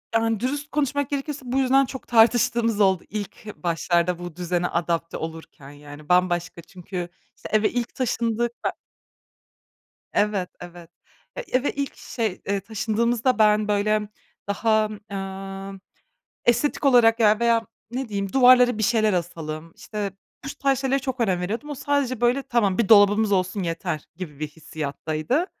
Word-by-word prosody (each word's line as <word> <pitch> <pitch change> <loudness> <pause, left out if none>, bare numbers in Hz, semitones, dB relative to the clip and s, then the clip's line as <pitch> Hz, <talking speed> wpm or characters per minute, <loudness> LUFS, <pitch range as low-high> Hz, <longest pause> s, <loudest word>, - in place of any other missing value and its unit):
Yani, 225 -2 +2
dürüst 290 +4 -3
konuşmak 285 -1 0
gerekirse 285 0 -3
bu 250 +1 -2
yüzden 270 +1 +4
çok 265 0 -9
tartıştığımız 230 -1 +3
oldu 190 -3 +3
ilk 210 0 -6
başlarda 170 +1 +1
bu 175 -2 -7
düzene 180 0 -1
adapte 170 -1 -2
olurken, 160 -3 -8
yani, 145 +1 -12
bambaşka 175 -1 +1
çünkü, 180 0 -7 0.3
işte, - - -10
eve 215 0 +3
ilk 240 -1 -3
taşındık, 235 -2 0
be - - +3 1.4
Evet, 205 -3 +1
evet, 175 -1 -11 0.5
ya, - - -3
eve 255 +3 +1
ilk 280 -1 -4
şey, 220 -6 -4
eee, 200 0 0
taşındığımızda 225 +4 0
ben, 210 0 +4
böyle, 210 +1 +1 0.4
daha, 215 +1 +2 0.2
eee, 195 0 -6 0.7
estetik 240 +5 +2
olarak 240 -3 +5
ya, 215 -1 +4
veya, 230 -1 +2 0.2
ne 255 -1 -4
diyeyim, 200 -2 -3
duvarlara 250 -2 +6
bir 220 - -1
şeyler 215 -1 +3
asalım, 165 -2 -4
işte, 205 -2 -5 0.3
bu - - -4
tarz 275 -1 +2
şeylere 270 0 +1
çok 260 -2 -4
önem 185 -6 +1
veriyordum. 225 +11 -4
O 290 - -4
sadece, 270 -3 -1
böyle, 245 +3 +3
"Tamam, 235 -8 +1
bir 230 -5 +1
dolabımız 205 0 +6
olsun 185 0 0
yeter." 165 -2 -3
gibi 160 -5 -8
bir 155 - -2
hissiyattaydı. 155 - -3
210 Hz, 150 wpm, -24 LUFS, 180-240 Hz, 1.4 s, duvarlara